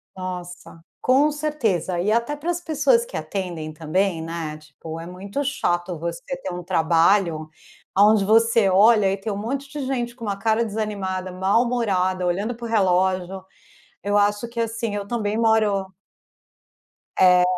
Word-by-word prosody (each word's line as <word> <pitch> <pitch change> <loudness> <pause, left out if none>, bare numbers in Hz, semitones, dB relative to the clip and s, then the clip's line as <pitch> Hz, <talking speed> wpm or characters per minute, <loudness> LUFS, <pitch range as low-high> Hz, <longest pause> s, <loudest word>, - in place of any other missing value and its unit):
Nossa, 180 -2 -7 0.2
com 280 +4 +4
certeza! 230 - -1
E 205 +4 +1
até 235 +6 +1
para 310 +4 -5
as 350 - -3
pessoas 410 - +2
que - - -10
atendem 175 -5 -4
também, 165 +2 -1
né, 165 -2 -5
tipo, 155 +2 -10
é 165 - -7
muito 195 +10 -5
chato 175 - -1
você 170 +7 -4 0.2
ter 190 - -3
um 180 0 -6
trabalho 165 -1 +2 0.5
aonde 205 +1 +5
você 225 -1 +4
olha 205 +1 +5
e 195 - -1
tem 205 +2 -4
um 200 - -3
monte 275 +6 -4
de 285 -2 -5
gente 240 -3 -2
com 230 -3 -8
uma 200 -1 -2
cara 220 +2 +1
desanimada, 200 -4 -3
mal-humorada, 190 -2 +1
olhando 200 +7 -1
para 235 0 -8
o - - -3
relógio. 185 -2 +1 0.6
Eu 205 +1 +1
acho 205 +3 +1
que, 235 0 -5
assim, 225 -1 -2
eu 200 -1 -4
também 215 -2 -2
moro 210 -4 +2 1.2
É. 180 -1 +6
200 Hz, 155 wpm, -23 LUFS, 180-230 Hz, 1.2 s, É